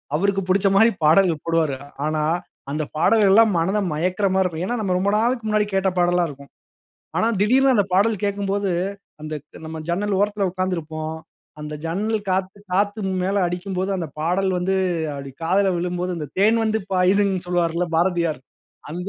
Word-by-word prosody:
அவருக்கு 195 +4 +1
பிடிச்ச 195 +1 +3
மாரி 225 +3 +6
பாடல்கள் 165 -1 +4
போடுவாரு. 160 -5 +1 0.3
ஆனா, 155 -1 0 0.5
அந்த 155 +1 -1
பாடல்கள்லாம் 215 +4 +5
மனத 190 +6 +1
மயக்கிற 180 +6 0
மாரி 190 0 +3
இருக்கும். 170 -1 -2
ஏன்னா, 245 - -1
நாம் 185 -3 0
ரொம்ப 200 +2 +1
நாளுக்கு 235 0 0
முன்னாடி 210 0 +2
கேட்ட 195 0 +2
பாடல்லாம் 175 0 +2
இருக்கும். 140 0 -12 0.7
ஆனா, - - +2
திடீர்னு 260 +5 +4
அந்த 205 - +3
பாடல் 210 +1 +2
கேட்கும்போது, 200 -1 -1 0.5
அந்தக் 155 -1 -8
நம்ம 160 0 -6
ஜன்னல் 195 +2 0
ஓரத்தில 205 -1 +1
உட்கார்ந்திருப்போம். 160 -4 -3 0.4
அந்த 150 0 -6
ஜன்னல் 210 +6 -1
காத்து 190 +2 -1
காத் 205 +2 +2
து - - -5 0.2
மேல 195 +2 0
அடிக்கும்போது, 185 +2 -3
அந்த 170 -4 -4
பாடல் 185 +4 +1
வந்து 190 +2 0 0.4
அப்டி 140 -1 -8
காதில 190 +3 +2
விழும்போது, 180 +1 -2
அந்த 150 -2 -5
"தேன் 220 +3 +4
வந்து 220 0 0
பாயுதுன்னு" 190 0 +2
சொல்வாருல்ல 175 0 0
பாரதியார். 170 -4 +1 0.5
அந்த 180 +4 -5
185 Hz, 155 wpm, -22 LUFS, 165-200 Hz, 0.7 s, மாரி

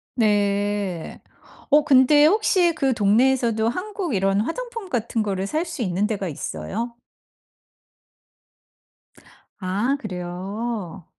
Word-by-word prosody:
네. 205 -4 0 0.5
어 295 0 +5
근데 285 +2 +6
혹시 365 -2 +3
그 275 -4 +1
동네에서도 230 +1 +2
한국 365 - -3
이런 195 +1 +2
화장품 460 - -5
같은 235 -3 -1
거를 195 -2 -2
살 315 - -1
수 325 -6 -6
있는 190 +2 0
데가 200 -4 -3
있어요? 155 - -5 2.7
아 205 +9 0
그래요. 190 - -5
225 Hz, 195 characters per minute, -23 LUFS, 195-290 Hz, 2.7 s, 근데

